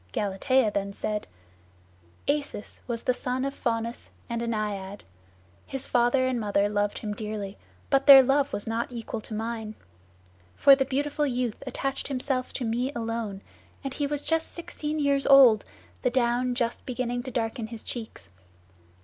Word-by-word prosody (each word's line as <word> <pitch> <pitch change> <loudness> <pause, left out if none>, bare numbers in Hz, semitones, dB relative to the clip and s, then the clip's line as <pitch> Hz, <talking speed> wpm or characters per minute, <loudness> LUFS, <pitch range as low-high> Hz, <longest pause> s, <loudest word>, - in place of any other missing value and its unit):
Galatea 210 +4 +2
then 200 0 -2
said, 210 +1 -3 1.0
"Acis 285 -7 -2
was 235 -2 -3
the 250 - +2
son 255 +1 -2
of 275 - -2
Faunus 230 -1 -3 0.2
and 235 0 -1
a 235 - -2
Naiad. 205 -3 -3 0.6
His 270 -1 -5
father 245 +2 +3
and 255 -2 0
mother 205 -2 +1
loved 205 0 0
him 210 -2 -4
dearly, 210 -2 -5 0.4
but 275 0 +3
their 270 -2 +11
love 275 +2 +2
was 205 - -3
not 230 +2 -2
equal 230 -1 -5
to 215 - -7
mine. 220 -1 -4 0.8
For 275 - +7
the 270 0 0
beautiful 290 +2 0
youth 245 -3 -2
attached 275 0 -2
himself 260 -1 -1
to 250 - -2
me 240 +4 0
alone, 225 -4 -3 0.4
and 270 -1 -4
he 290 +1 -1
was 290 0 -3
just 325 0 0
sixteen 310 -2 -4
years 280 -2 +1
old, 260 -6 +7 0.4
the 250 - +2
down 245 0 +1
just 235 -1 -1
beginning 245 -1 -2
to 260 - -6
darken 230 -2 -2
his 225 -1 -8
cheeks. 220 - -7
240 Hz, 160 wpm, -27 LUFS, 220-270 Hz, 1.0 s, their